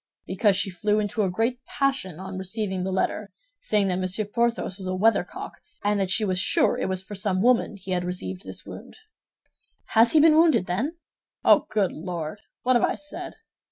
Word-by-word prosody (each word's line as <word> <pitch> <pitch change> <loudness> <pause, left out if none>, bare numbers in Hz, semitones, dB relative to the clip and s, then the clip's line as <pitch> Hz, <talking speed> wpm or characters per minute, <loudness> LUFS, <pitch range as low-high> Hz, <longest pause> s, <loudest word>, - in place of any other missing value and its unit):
"Because 195 +1 +2
she 195 0 -1
flew 210 +3 0
into 210 +1 -1
a 195 - +1
great 230 +7 -1
passion 265 - -1
on 190 0 -6
receiving 190 -1 -3
the 190 - -2
letter, 200 +2 -1 0.3
saying 205 -2 +1
that 180 0 0
Monsieur 185 +3 -1
Porthos 230 -2 -1
was 190 - -5
a 185 - -1
weathercock, 225 +4 0 0.2
and 205 0 +1
that 190 -2 0
she 215 +3 +1
was 185 -2 0
sure - - +2
it - - -2
was 185 0 -2
for 205 - -10
some 195 -1 -1
woman 245 -3 +3
he 190 0 -8
had 180 -1 0
received 180 +1 -5
this - - -7
wound." - - -10 0.9
"Has 230 +1 +5
he 315 - +6
been 310 0 +6
wounded, 320 - +4
then?" 235 - -2 0.5
"Oh, - - +5
good 200 -4 +1
Lord! 170 +2 -5 0.2
What 255 0 +3
have 240 - +3
I - - +2
said?" 295 - -7
200 Hz, 195 wpm, -25 LUFS, 185-225 Hz, 0.9 s, he